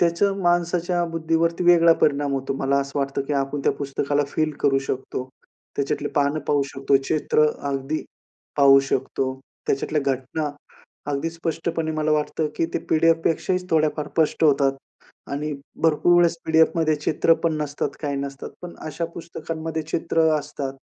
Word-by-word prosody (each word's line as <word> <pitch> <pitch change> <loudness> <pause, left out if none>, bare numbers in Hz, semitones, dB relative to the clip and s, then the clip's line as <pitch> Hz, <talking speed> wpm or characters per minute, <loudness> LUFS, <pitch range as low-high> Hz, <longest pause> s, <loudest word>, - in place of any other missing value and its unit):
त्याचा 175 +3 +3
माणसाच्या 175 0 +1
बुद्धीवरती 165 +1 0
वेगळा 170 -1 +7
परिणाम 145 -1 +2
होतो. 135 0 -2
मला 140 +1 +2
असं 140 +1 -4
वाटतं 140 0 -1
की 150 - -2
आपण 140 +1 -1
त्या - - +4
पुस्तकाला 145 +1 -1
फील 155 +1 0
करू 135 -1 +3
शकतो. 130 -1 -4 0.5
त्याच्यातले 140 -1 -1
पानं 145 +1 +2
पाहू 145 -1 +3
शकतो. 135 0 +3
चित्र 150 -1 +3 0.2
अगदी 140 +3 -2 0.5
पाहू 135 -1 +7
शकतो. 135 -1 -1 0.3
त्याच्यातल्या 150 +2 0
घटना 140 +4 -4 0.6
अगदी 145 +4 -1
स्पष्टपणे 165 0 -3
मला 155 0 +1
वाटतं 150 +1 0
की 165 - +1
ते - - 0
पी-डी-एफपेक्षाही 165 +3 +2
थोड्याफार 155 -1 +1
स्पष्ट 160 0 0
होतात. 140 -2 +4 0.6
आणि 150 +2 -2 0.3
भरपूर 165 +2 +4
वेळेस 170 -1 +4
पी-डी-एफमध्ये 160 0 +3
चित्र 150 +2 +2
पण 165 - +2
नसतात, 145 -1 -2
काही 145 -2 -2
नसतात. 140 -1 -5
पण 175 -1 -8
अशा 155 +2 -3
पुस्तकांमध्ये 160 -1 -5
चित्र 165 +1 0 0.2
असतात. 140 -2 -5
155 Hz, 145 wpm, -23 LUFS, 140-165 Hz, 0.6 s, वेगळा